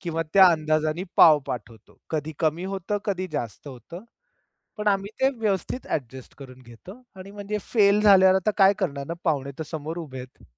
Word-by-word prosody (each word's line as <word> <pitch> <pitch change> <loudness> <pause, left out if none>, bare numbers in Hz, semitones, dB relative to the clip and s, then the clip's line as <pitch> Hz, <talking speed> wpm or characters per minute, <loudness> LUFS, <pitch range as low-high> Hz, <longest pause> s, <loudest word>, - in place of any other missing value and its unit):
किंवा 165 -2 -3
त्या 190 -1 +8
अंदाजाने 155 +1 -1
पाव 155 -3 +7
पाठवतो. 115 -2 -8
कधी 155 0 -3
कमी 160 +2 -1
होतं, 195 +1 -3
कधी 185 -2 -2
जास्त 120 - -5
होतं, 140 - -11 0.7
पण 210 0 -3
आम्ही 195 0 0
ते 265 - +4
व्यवस्थित 215 +4 -2
ॲडजस्ट 130 -2 -5
करून 130 -2 -13
घेतो. 125 - -14
आणि 190 +1 -11
म्हणजे 205 +1 -5 0.2
फेल 205 -2 +4
झाल्यावर 190 -2 +6
आता 190 +3 +1
काय 195 0 +6
करणार 140 -7 -3
ना 170 - -3
पाहुणे 140 -5 -1
तर - - -2
समोर 160 +1 -5
उभे 140 -5 -8
आहेत. 125 +1 -13
170 Hz, 175 wpm, -24 LUFS, 140-195 Hz, 0.7 s, त्या